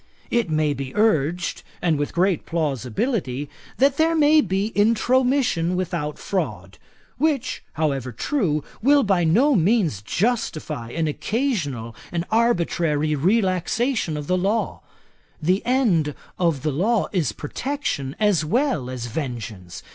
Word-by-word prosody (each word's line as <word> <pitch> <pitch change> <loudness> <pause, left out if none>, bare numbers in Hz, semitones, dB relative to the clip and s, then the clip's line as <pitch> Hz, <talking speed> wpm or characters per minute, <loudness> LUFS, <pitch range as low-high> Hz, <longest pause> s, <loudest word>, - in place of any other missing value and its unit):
'It 235 -6 +1
may 155 -1 +1
be 135 +2 -6
urged, 175 -5 +1 0.2
and 165 -3 +1
with 145 - -1
great 180 0 +1
plausibility, 145 - -1 0.3
that 275 +1 +3
there 325 +1 +3
may 305 0 +5
be 195 - -1
Intromission 230 -4 +2
without 170 -5 -2
fraud; 190 -2 -4 0.4
which, 285 -5 0
however 140 -5 -1
true, 155 - -1 0.2
will 280 +4 +5
by 195 -4 +2
no 235 - +4
means 185 - +2
justify 180 - -2
an 160 +5 -1
occasional 150 - -2 0.2
and 170 0 -2
arbitrary 170 -9 +1
relaxation 185 - +1
of 150 - -5
the 185 +3 +1
law. 205 +5 -1 0.6
The 180 +5 +1
end 195 - +2 0.2
of 165 -6 +1
law 190 - +1
is 165 - 0
protection 145 - -3
as 205 -7 +3
well 200 - 0
as 125 -2 -5
vengeance. 110 - -6
175 Hz, 125 wpm, -23 LUFS, 150-230 Hz, 0.6 s, may